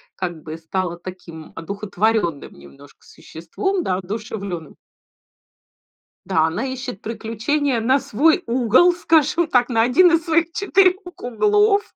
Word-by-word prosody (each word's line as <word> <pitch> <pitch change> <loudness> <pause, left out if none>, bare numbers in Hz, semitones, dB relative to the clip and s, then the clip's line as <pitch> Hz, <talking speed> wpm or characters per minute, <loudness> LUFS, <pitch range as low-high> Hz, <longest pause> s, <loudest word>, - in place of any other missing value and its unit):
как 175 -4 -5
бы, 160 0 -8
стала 175 +1 -3
таким 175 -3 -10
одухотворённым 200 -2 -2
немножко 70 -1 -17
существом, 370 - -4
да, 185 -1 -1
одушевлённым. 200 - -6 1.5
Да, 165 -4 +2
она 165 +11 -2
ищет 255 -5 -6
приключения 230 +4 -2
на 260 +4 +2
свой 290 - +2
угол, 255 - +3
скажем 330 -1 +2
так, 250 -3 +2
на 225 -2 +2
1 280 +10 +5
из 330 -1 +1
своих 330 0 +1
4 380 -2 +3 0.2
углов. 415 - +2
230 Hz, 120 wpm, -20 LUFS, -, 1.5 s, 1